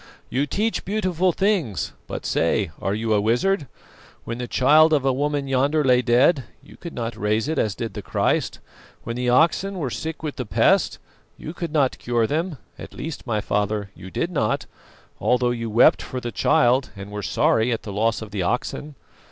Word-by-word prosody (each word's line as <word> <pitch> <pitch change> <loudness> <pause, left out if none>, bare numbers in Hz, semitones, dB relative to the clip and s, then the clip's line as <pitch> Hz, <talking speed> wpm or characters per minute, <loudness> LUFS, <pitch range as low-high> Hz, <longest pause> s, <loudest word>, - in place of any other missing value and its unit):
You 140 +3 0
teach 220 +8 -1
beautiful 185 -3 0
things, 185 - 0
but - - -6
say, 85 +2 +1
are 95 +2 -1
you 110 0 0
a 105 - +3
wizard? 135 - +1 0.6
When 115 +1 -5
the 125 - -4
child 155 +6 +5
of 140 -3 +2
a 135 - +3
woman 145 +1 -1
yonder 140 +4 +2
lay 125 -2 +4
dead, 125 +3 +3 0.2
you - - -15
could 170 - -9
not 115 -1 -3
raise 105 +3 0
it 160 -1 -1
as 105 -2 0
did 115 -3 -5
the - - -5
Christ; - - 0 0.5
when 115 - -4
the 125 0 -1
oxen 170 +9 +2
were 140 -8 -3
sick 160 +4 -5
with 150 -2 -4
the 125 - -3
pest, - - +3 0.4
you 155 - -7
could 170 -2 -5
not 145 -4 +1
cure 120 -1 +1
them; 160 +8 -1
or - - -11 0.3
at - - -11
least, 155 -3 -6
my 110 -3 0
father, 105 -1 -1
you 95 - -11
did 170 - -2
not, 140 -11 0 0.5
although 125 -1 +2
you 115 -1 -3
wept 115 +3 +5
for 130 - -5
the 120 -1 -5
child 125 +3 +3
and 100 +1 -9
were 105 0 -4
sorry 110 +4 +2
at 115 - -2
the 100 - -6
loss 115 +2 0
of 105 - -10
the 100 -2 -2
oxen. 135 +8 -2
125 Hz, 200 wpm, -23 LUFS, 110-155 Hz, 0.6 s, child